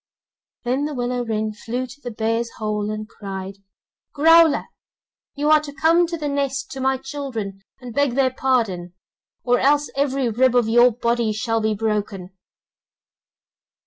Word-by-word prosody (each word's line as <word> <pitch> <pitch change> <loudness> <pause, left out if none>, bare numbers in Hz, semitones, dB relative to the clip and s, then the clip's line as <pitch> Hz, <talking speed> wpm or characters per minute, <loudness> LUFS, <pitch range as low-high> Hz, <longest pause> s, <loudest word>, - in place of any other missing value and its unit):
Then 260 +4 0
the 300 -1 -4
willow 245 0 -1
wren 220 -2 -2
flew 240 +4 -4
to 265 +3 -14
the 245 - -5
bear's 230 +1 -1
hole 210 -1 -2
and 215 0 -4
cried: 195 -3 -7 0.6
'Growler, 325 +1 +6 0.7
you 295 +1 +1
are 310 - +7
to 300 -1 -8
come 330 +4 +3
to 335 0 -4
the 300 -2 -3
nest 280 -1 -2
to 270 - -6
my 265 0 +1
children, 255 -8 -6 0.2
and 250 -2 -9
beg 285 -2 +1
their 265 -1 +2
pardon, 220 -10 -1 0.5
or 245 0 +2
else 290 +2 +2
every 275 -2 0
rib 245 +2 +2
of 240 -3 +3
your 240 +2 +6
body 235 -1 0
shall 225 +1 -1
be 215 0 0
broken. 205 -3 -3
245 Hz, 155 wpm, -22 LUFS, 215-275 Hz, 0.7 s, are